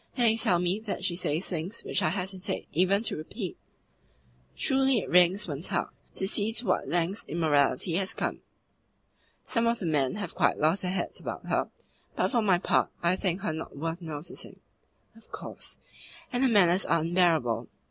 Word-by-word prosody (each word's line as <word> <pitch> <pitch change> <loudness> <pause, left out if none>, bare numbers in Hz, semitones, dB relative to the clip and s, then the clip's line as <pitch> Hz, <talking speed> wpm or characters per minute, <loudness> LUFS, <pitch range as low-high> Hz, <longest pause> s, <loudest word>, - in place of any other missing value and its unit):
And 245 - +4
they 225 -1 +5
tell 185 -5 +3
me 180 +3 0
that 215 -4 -5
she 175 - +1
says 165 0 -1
things 180 +5 -4
which - - 0
I - - +2
hesitate 190 +2 -2
even 190 +5 +3
to - - -1
repeat." 180 +5 -5 1.0
"Truly 270 -1 +3
it 210 - -2
wrings 180 +3 +4
one's 150 +2 -3
heart - - -1 0.2
to 190 - -1
see 210 +1 +2
to 235 +2 -1
what 185 - +1
lengths 175 +4 0
immorality 145 -1 +2
has 195 0 -1
come." - - -2 1.0
"Some 230 -1 +1
of 235 0 +2
the 190 - -5
men 145 -5 +1
have 200 -5 -4
quite - - +2
lost 160 +5 +2
their 180 - -2
heads 185 -1 -3
about - - -6
her, - - +1 0.5
but - - +1
for 240 - +3
my 195 -4 +4
part 175 - +2
I 170 +2 +3
think 185 -1 -1
her 195 - -1
not 160 -2 -7
worth 165 +4 -3
noticing." 160 +1 -7 0.6
"Of 225 -1 -19
course. - - -7 0.6
And 245 - +1
her 265 - +4
manners 190 -4 +5
are - - +2
unbearable. 165 -8 +2
180 Hz, 185 wpm, -28 LUFS, 165-205 Hz, 1.0 s, they